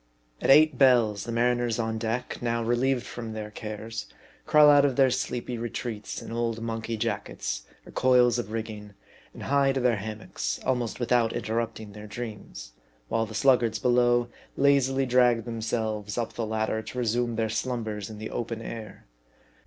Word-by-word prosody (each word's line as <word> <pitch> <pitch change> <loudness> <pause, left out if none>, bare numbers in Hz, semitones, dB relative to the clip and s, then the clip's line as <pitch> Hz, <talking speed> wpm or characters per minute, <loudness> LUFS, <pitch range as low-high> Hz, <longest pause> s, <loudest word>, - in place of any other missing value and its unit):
At - - 0
eight 150 -1 +6
bells, 115 -7 +4
the 115 - -4
mariners 120 0 +1
on 110 -1 -2
deck, 115 +2 -3
now 115 -1 0
relieved 120 +2 +1
from 115 -2 -6
their 105 -1 -6
cares, 110 +1 -6 0.4
crawl 150 -1 +7
out 145 -1 +6
from 140 -3 +2
their 135 -1 +4
sleepy 125 -1 -3
retreats 115 -2 -5
in - - -8
old 115 -1 -1
monkey 115 0 -3
jackets, 100 - -3 0.2
or - - -12
coils 125 -2 +4
of 115 - -5
rigging, 105 -2 -6 0.4
and - - -10
hie 140 0 +3
to 135 - -1
their 120 -3 +2
ham 105 +1 -5
mocks, - - -4
almost 125 -3 -1
without 120 -2 +2
interrupting 110 -1 -3
their 105 +1 -10
dreams: 105 - -7 0.4
while 115 0 0
the 110 - -9
sluggards 120 -5 +3
below 120 0 +3 0.3
lazily 135 -1 +3
drag 120 -2 +3
themselves 110 -2 -3
up 120 -2 -2
the 115 -2 -3
ladder 110 0 -1
to 110 +3 -9
re 125 - 0
sume 120 +1 0
their 110 0 0
slumbers 110 -3 -3
in 110 - -8
the 110 +1 -6
open 115 -1 -3
air. 115 -1 -8
115 Hz, 170 wpm, -27 LUFS, 110-125 Hz, 0.4 s, crawl